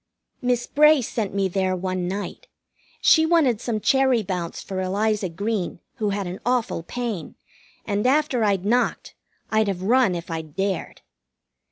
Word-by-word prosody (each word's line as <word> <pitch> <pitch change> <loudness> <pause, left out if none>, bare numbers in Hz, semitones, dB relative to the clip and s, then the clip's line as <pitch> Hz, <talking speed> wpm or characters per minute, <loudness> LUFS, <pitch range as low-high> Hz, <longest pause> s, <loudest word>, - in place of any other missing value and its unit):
Miss 245 -1 +1
Bray 300 -2 +5
sent 220 -2 -3
me 195 -1 +2
there 185 0 0
one 185 -1 -2
night. 200 +3 -5 0.5
She 320 - +6
wanted 315 -9 +3
some 225 -3 -2
cherry 265 -1 +3
bounce 180 -3 -4
for 190 -1 -4
Eliza 200 +1 0
Green, 200 +2 -2 0.2
who 215 -4 0
had 200 -1 -2
an 180 +3 -6
awful 245 -7 0
pain, 220 0 -5 0.5
and 205 +2 0
after 275 -3 +2
I'd 200 -3 +1
knocked, 245 +4 0 0.4
I'd 220 -1 +3
have 185 -2 -2
run 235 -2 +3
if 170 0 -6
I'd 160 -2 -6
dared. 195 -2 -2
205 Hz, 155 wpm, -23 LUFS, 185-245 Hz, 0.5 s, She